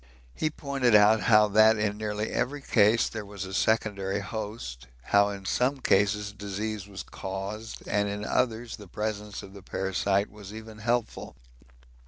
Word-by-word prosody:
He 155 - 0
pointed 135 -6 +1
out 105 +1 +6
how 105 -2 +5
that 110 +2 +6
in 105 -1 0
nearly 105 0 -3
every 140 +3 -2
case 110 -1 +4
there 110 -2 -5
was 100 -1 -7
a 95 - -8
secondary 100 -2 +1
host, 100 - -6 0.2
how 100 +8 +4
in 100 -1 -7
some 130 +7 +1
cases 105 -2 +2
disease 105 0 -4
was 100 -1 -7
caused, 100 +3 -6
and 105 -1 +1
in 105 +1 -4
others 120 -1 -1
the 105 - -12
presence 105 +1 -4
of 95 - -11
the 100 - -11
parasite 95 +1 0
was 105 -1 -10
even 110 -1 -10
helpful. 120 +1 -2
105 Hz, 160 wpm, -28 LUFS, 100-110 Hz, 0.2 s, out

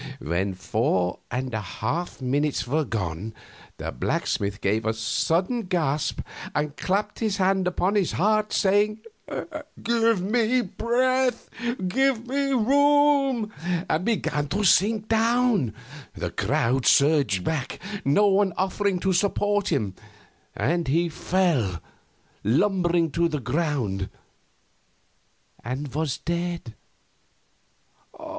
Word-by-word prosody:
When 95 +5 -2
four 90 0 0
and 125 0 -3
a 110 - -1
half 125 - -4
minutes 145 +3 0
were 150 +4 +1
gone 105 -1 -4 0.4
the - - -4
blacksmith 100 +1 -1
gave 110 +3 0
a 110 +1 0
sudden 180 - 0
gasp 155 -5 0 0.3
and 150 0 -1
clapped 200 +5 -1
his 215 -3 0
hand 190 -1 +2
upon 180 +2 0
his 200 -5 +1
heart, 215 +3 +2
saying, 205 +2 +2 0.8
"Give 230 -3 +2
me 230 +4 +2
breath! 250 +4 0 0.4
Give 260 +2 +1
me 275 +2 -1
room!" 275 -2 +3 0.3
and 160 +3 0
began 165 -9 0
to 200 +9 -1
sink 210 +3 +3
down. 225 - +2 0.4
The - - -4
crowd 125 +2 0
surged 140 - +4
back, 140 - -2 0.3
no 145 +10 +4
one 195 -1 +3
offering 195 0 0
to 190 -1 +1
support 205 +1 +1
him, 110 - 0 0.6
and 170 +3 0
he 170 +5 +2
fell 155 - 0 0.6
lumbering 175 - +2
to 170 +2 +2
the 150 -2 -2
ground 125 - -1 1.5
and 130 +3 -4
was 150 -2 -1
dead. 170 -7 -3
175 Hz, 110 wpm, -25 LUFS, 130-215 Hz, 1.5 s, surged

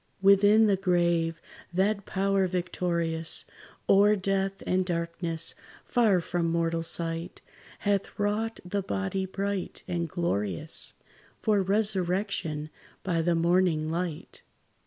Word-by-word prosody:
Within 205 +3 +6
the 200 -2 +3
grave, 170 -3 +1 0.3
that 200 +3 0
power 195 0 +1
victorious 170 -2 -1 0.4
O'er 205 +2 +5
death 195 0 -1
and 185 0 +1
darkness, 170 -1 -2 0.3
far 220 -7 +3
from 170 0 -1
mortal 165 0 0
sight, 165 +1 -1 0.4
Hath 200 -1 -1
wrought 210 +2 -1
the 200 +3 -2
body 100 - -2
bright 195 0 -4
and 170 -2 -2
glorious 150 - 0 0.5
For 210 -3 +3
resurrection 190 -5 -1 0.3
by 170 -3 0
the 170 +1 +1
morning 170 -2 +2
light. 170 -2 -4
180 Hz, 110 wpm, -28 LUFS, 165-195 Hz, 0.5 s, Within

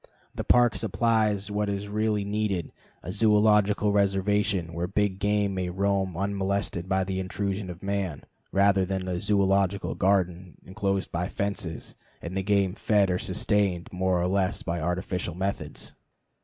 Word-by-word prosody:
The - - -4
Park 120 -1 +4
supplies 105 -1 +1
what 105 0 0
is 100 0 -3
really 105 0 0
needed 100 -5 -1 0.3
a 80 - -7
zoölogical 105 0 +3
reservation 100 -2 +1
where 85 +1 -2
big 100 0 0
game 105 -1 +1
may 90 -1 -2
roam 95 -1 0
unmolested 100 -2 -1
by 95 0 +2
the 95 0 -3
intrusion 95 +1 -3
of 90 +1 -9
man, 100 -6 -2 0.3
rather 100 -1 +4
than 95 0 -3
a 90 -1 -1
zoölogical 100 -1 +1
garden 90 -2 0
inclosed 95 0 -2
by 85 +1 -1
fences, 100 -6 -4 0.3
and 85 +2 -6
the 95 - 0
game 100 -1 +2
fed 100 -2 +2
or 90 - 0
sustained 100 -3 0
more 90 0 +1
or 85 - +1
less 95 0 0
by 85 -1 -2
artificial 90 0 -2
methods. 95 +2 -4
100 Hz, 150 wpm, -27 LUFS, 90-105 Hz, 0.3 s, Park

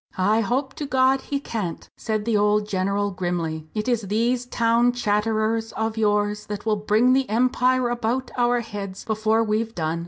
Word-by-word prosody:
"I 205 +4 +3
hope 265 +5 -1
to 295 - -4
God 265 0 +3
he 280 +1 -3
can't!" 210 -11 -5
said 215 -2 -3
the 230 -2 +1
old 210 0 +2
general, 200 +1 0
grimly; 170 -4 -3
"it 215 +1 -2
is 240 -2 +1
these 235 +5 0
town 235 +1 +2
chatterers 220 0 0
of 220 0 -2
yours 210 -1 0
that 205 0 -6
will 215 -1 +1
bring 215 +5 +3
the 265 0 +1
Empire 250 +2 +2
about 240 +2 -2
our 245 0 +2
heads 200 -4 -7
before 220 +1 +1
we've 225 +1 -1
done. 160 0 -2
220 Hz, 175 wpm, -23 LUFS, 205-240 Hz, -, I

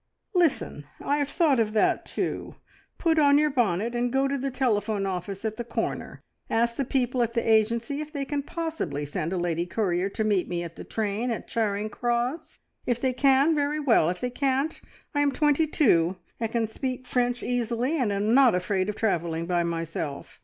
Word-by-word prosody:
"Listen! 320 - +1
I 285 - 0
have 285 -1 0
thought 290 -6 +3
of 215 -1 +1
that 215 - +2
too. - - -3 0.4
Put 325 -2 +2
on 285 -1 +6
your 300 0 +3
bonnet 230 -3 +1
and 240 0 0
go 270 +1 +2
to 275 - -1
the 275 0 -2
telephone 220 -6 0
office 190 +2 -4
at 220 0 -2
the 240 - -3
corner. 235 - -4 0.3
Ask 235 +1 +1
the 275 - -1
people 250 -1 0
at 235 0 -1
the 235 - 0
agency 230 +5 +2
if 305 0 -7
they 285 -3 -3
can 285 +1 -2
possibly 280 - -3
send 155 +3 -3
a 190 - -1
lady 175 0 -1
courier 180 -1 0
to 220 - -2
meet 205 -4 +1
me 175 -1 -2
at 170 -1 -8
the - - -8
train 220 +2 -2
at 230 - -3
Charing 215 -2 -1
Cross. 240 +7 -2 0.3
If 245 -1 +1
they 260 0 0
can, 275 +4 +4
very 295 0 0
well! 235 - +4
If 180 0 -4
they 250 - -2
can't, 275 +4 0 0.3
I 290 - +2
am 285 -1 +3
twenty 295 +3 +2
two, 185 - +3 0.2
and 225 -1 -2
can 230 -1 0
speak 255 +3 -4
French 245 -1 0
easily, 245 +5 0
and 220 -5 +1
am 205 +3 +1
not 260 -5 +6
afraid 185 +1 0
of 210 - -3
travelling 170 -6 -1
by 175 0 +1
myself. 165 -3 -4
235 Hz, 200 wpm, -26 LUFS, 195-275 Hz, 0.4 s, on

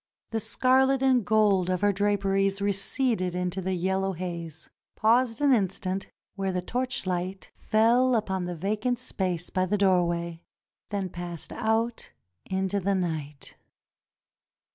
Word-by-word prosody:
The 225 - 0
scarlet 265 +4 +2
and 255 -3 +4
gold 200 -3 +3
of 185 -1 0
her 205 0 +3
draperies 195 0 +1
receded 200 -1 0
into 180 +1 -2
the 190 0 -1
yellow 190 +2 0
haze 170 -3 -6 0.2
— - - -64
paused 230 +2 +2
an 285 -2 +5
instant 195 -3 -1 0.3
where 195 -1 -2
the 180 - -1
torchlight 190 -4 -3
fell 240 +4 +3
upon 190 -4 -1
the 175 0 -4
vacant 215 +8 -1
space 185 -7 -3
by 185 0 +1
the 210 +3 +1
door 185 -3 +3
way, 170 -1 -3 0.5
then 200 -2 -2
passed 175 -2 -6
out 225 +1 -1 0.3
into 190 +1 -1
the 195 +1 0
night. 155 -6 -4
195 Hz, 140 wpm, -27 LUFS, 180-220 Hz, 0.5 s, an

